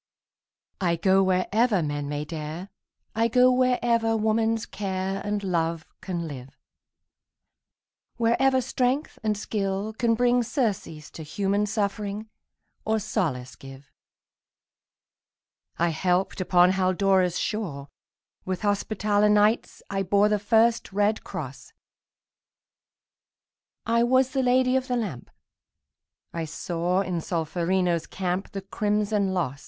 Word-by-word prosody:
I 175 Hz, -2 st, +2 dB
go 190 Hz, +3 st, +3 dB
wherever 195 Hz, +2 st, +2 dB
men 145 Hz, -1 st, -3 dB
may 145 Hz, 0 st, -3 dB
dare, 160 Hz, +4 st, -6 dB, 0.4 s
I 225 Hz, +1 st, +2 dB
go 250 Hz, +2 st, +5 dB
wherever 240 Hz, -3 st, +2 dB
woman's 220 Hz, +1 st, +1 dB
care 190 Hz, -2 st, -3 dB
And 205 Hz, 0 st, -2 dB
love 165 Hz, -3 st, -1 dB, 0.2 s
can 175 Hz, -3 st, -4 dB
live, 135 Hz, -3 st, -9 dB, 1.6 s
Wherever 260 Hz, +3 st, +3 dB
strength 260 Hz, +3 st, -1 dB
and 215 Hz, -1 st, 0 dB
skill 200 Hz, 0 st, -2 dB
can 230 Hz, 0 st, +1 dB
bring 245 Hz, +1 st, +3 dB
Surcease 210 Hz, -, -2 dB
to -, -, -9 dB
human 200 Hz, +6 st, -1 dB
suffering, 210 Hz, 0 st, -3 dB, 0.5 s
Or 220 Hz, 0 st, +1 dB
solace 125 Hz, -, -2 dB
give. 135 Hz, +2 st, -13 dB, 1.9 s
I 170 Hz, +1 st, +2 dB
helped 180 Hz, +3 st, 0 dB
upon 180 Hz, 0 st, +4 dB
Haldora's 185 Hz, -1 st, +2 dB
shore; 165 Hz, -11 st, -3 dB, 0.6 s
With 185 Hz, +1 st, -4 dB
Hospitaller 205 Hz, 0 st, +1 dB
Knights 210 Hz, +2 st, +2 dB
I 195 Hz, 0 st, 0 dB
bore 200 Hz, +2 st, +3 dB
The 210 Hz, -1 st, +1 dB
first 225 Hz, +2 st, +2 dB
red 205 Hz, +2 st, +1 dB
cross; -, -, -7 dB, 2.1 s
I 230 Hz, +1 st, +2 dB
was 255 Hz, +2 st, +3 dB
the 270 Hz, -, 0 dB
Lady 255 Hz, 0 st, +3 dB
of 260 Hz, 0 st, 0 dB
the 250 Hz, -2 st, 0 dB
Lamp; 185 Hz, -, -4 dB, 1.0 s
I 165 Hz, -1 st, -3 dB
saw 175 Hz, +3 st, -1 dB
in 175 Hz, -3 st, -2 dB
Solferino's 170 Hz, +1 st, -1 dB
camp 185 Hz, 0 st, -3 dB
The 195 Hz, -, -4 dB
crimson 205 Hz, 0 st, 0 dB
loss. 145 Hz, -6 st, -2 dB
200 Hz, 115 wpm, -26 LUFS, 175-225 Hz, 2.1 s, go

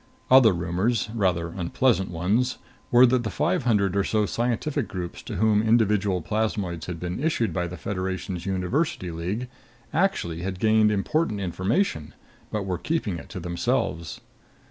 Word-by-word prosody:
Other 130 Hz, -4 st, +8 dB
rumors, 95 Hz, +6 st, -1 dB
rather 90 Hz, -6 st, 0 dB
unpleasant 95 Hz, +4 st, +1 dB
ones, 100 Hz, +10 st, 0 dB, 0.3 s
were 125 Hz, +1 st, +7 dB
that 125 Hz, 0 st, +2 dB
the 110 Hz, -, -2 dB
five 120 Hz, -, 0 dB
hundred 100 Hz, -5 st, +2 dB
or 100 Hz, -, +2 dB
so 105 Hz, 0 st, +1 dB
scientific 120 Hz, +7 st, -1 dB
groups 90 Hz, -4 st, -6 dB
to 110 Hz, -, -7 dB
whom 105 Hz, +1 st, +3 dB
individual 105 Hz, -5 st, +2 dB
plasmoids 100 Hz, -5 st, -2 dB
had 90 Hz, -2 st, -5 dB
been 90 Hz, -, -4 dB
issued 155 Hz, -8 st, +1 dB
by 90 Hz, -1 st, -1 dB
the 90 Hz, +1 st, -7 dB
Federation's 95 Hz, -1 st, -4 dB
University 95 Hz, -, -1 dB
League 90 Hz, +9 st, -3 dB, 0.5 s
actually 155 Hz, -, 0 dB
had 95 Hz, +1 st, -3 dB
gained 110 Hz, 0 st, +4 dB
important 105 Hz, +3 st, 0 dB
information, 95 Hz, -, -1 dB, 0.3 s
but 105 Hz, -2 st, -3 dB
were 90 Hz, -2 st, -2 dB
keeping 105 Hz, -, -2 dB
it -, -, -12 dB
to 95 Hz, -, -6 dB
themselves. 85 Hz, -1 st, -2 dB
100 Hz, 150 wpm, -25 LUFS, 90-115 Hz, 0.5 s, Other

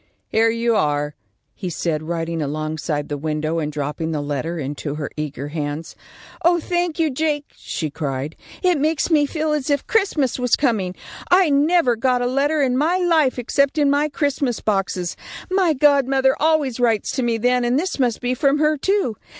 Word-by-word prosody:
"Here 225 Hz, +1 st, +3 dB
you 230 Hz, 0 st, +1 dB
are," 150 Hz, -5 st, 0 dB, 0.4 s
he 185 Hz, -, -5 dB
said, 160 Hz, -2 st, -2 dB
riding 165 Hz, 0 st, -3 dB
alongside 155 Hz, 0 st, -3 dB
the 145 Hz, -1 st, -4 dB
window 155 Hz, +2 st, -1 dB
and 150 Hz, -1 st, -2 dB
dropping 150 Hz, +2 st, -3 dB
the 155 Hz, -, -1 dB
letter 145 Hz, +4 st, -3 dB
into 145 Hz, 0 st, -4 dB
her 150 Hz, -2 st, -5 dB
eager 145 Hz, -2 st, -5 dB
hands. 150 Hz, +1 st, -4 dB, 0.5 s
"Oh, 345 Hz, +1 st, +4 dB
thank 350 Hz, 0 st, -1 dB
you, 320 Hz, -3 st, +1 dB
Jake," 295 Hz, +1 st, -1 dB
she 155 Hz, -3 st, -4 dB
cried. 140 Hz, 0 st, -4 dB, 0.3 s
"It 360 Hz, -4 st, +3 dB
makes 310 Hz, +2 st, 0 dB
me 295 Hz, -2 st, +4 dB
feel 310 Hz, +1 st, -1 dB
as 295 Hz, -1 st, -2 dB
if 285 Hz, -1 st, +1 dB
Christmas 320 Hz, -, +1 dB
was 250 Hz, -2 st, +3 dB
coming. 210 Hz, -10 st, 0 dB, 0.3 s
I 360 Hz, -3 st, +5 dB
never 285 Hz, -2 st, +3 dB
got 250 Hz, +1 st, +1 dB
a -, -, 0 dB
letter 280 Hz, +4 st, +1 dB
in 255 Hz, -2 st, +1 dB
my 325 Hz, +6 st, +2 dB
life 325 Hz, -8 st, +2 dB
except 280 Hz, +4 st, +1 dB
in 290 Hz, -2 st, +3 dB
my 290 Hz, +2 st, +2 dB
Christmas 280 Hz, -4 st, -1 dB
boxes. 195 Hz, -4 st, -1 dB, 0.4 s
My 370 Hz, -4 st, +3 dB
godmother 270 Hz, -1 st, +3 dB
always 300 Hz, -5 st, +1 dB
writes 230 Hz, -3 st, +1 dB
to -, -, +1 dB
me 235 Hz, -2 st, +1 dB
then, 245 Hz, +2 st, +2 dB
and 240 Hz, +2 st, +2 dB
this 360 Hz, 0 st, -2 dB
must 245 Hz, -4 st, +1 dB
be 250 Hz, 0 st, 0 dB
from 275 Hz, +3 st, +2 dB
her, 305 Hz, 0 st, +2 dB
too. 380 Hz, -, 0 dB
250 Hz, 185 wpm, -21 LUFS, -, 0.5 s, I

